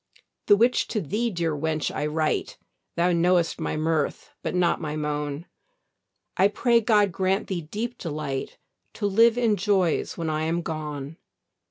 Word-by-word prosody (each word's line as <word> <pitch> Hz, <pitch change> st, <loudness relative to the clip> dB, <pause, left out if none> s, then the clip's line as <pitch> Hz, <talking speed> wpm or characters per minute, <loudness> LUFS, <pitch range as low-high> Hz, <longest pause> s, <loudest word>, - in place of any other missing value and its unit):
The 205 Hz, -, +8 dB
which 235 Hz, +4 st, +2 dB
to 220 Hz, -, -1 dB
thee, 210 Hz, +8 st, -1 dB
dear 170 Hz, -6 st, -1 dB
wench, 155 Hz, +1 st, -1 dB
I 150 Hz, -, -1 dB
write, 155 Hz, 0 st, -1 dB, 0.4 s
Thou 175 Hz, +1 st, +2 dB
know'st 175 Hz, 0 st, +2 dB
my -, -, -2 dB
mirth 155 Hz, -1 st, -1 dB
but -, -, -3 dB
not 175 Hz, -2 st, +2 dB
my 150 Hz, -1 st, -3 dB
moan; 150 Hz, 0 st, -3 dB, 0.9 s
I 190 Hz, -, +5 dB
pray 235 Hz, +3 st, +2 dB
God 210 Hz, -3 st, +3 dB
grant 190 Hz, +2 st, 0 dB
thee 185 Hz, -3 st, -3 dB
deep 225 Hz, +10 st, -5 dB
delight, 150 Hz, -5 st, -4 dB, 0.4 s
To -, -, -4 dB
live 225 Hz, +4 st, +4 dB
in 225 Hz, -4 st, +2 dB
joys 190 Hz, -4 st, +1 dB
when 165 Hz, -, -3 dB
I 155 Hz, 0 st, -1 dB
am 170 Hz, +2 st, -1 dB
gone. 150 Hz, -1 st, -5 dB
170 Hz, 160 wpm, -25 LUFS, 155-205 Hz, 0.9 s, The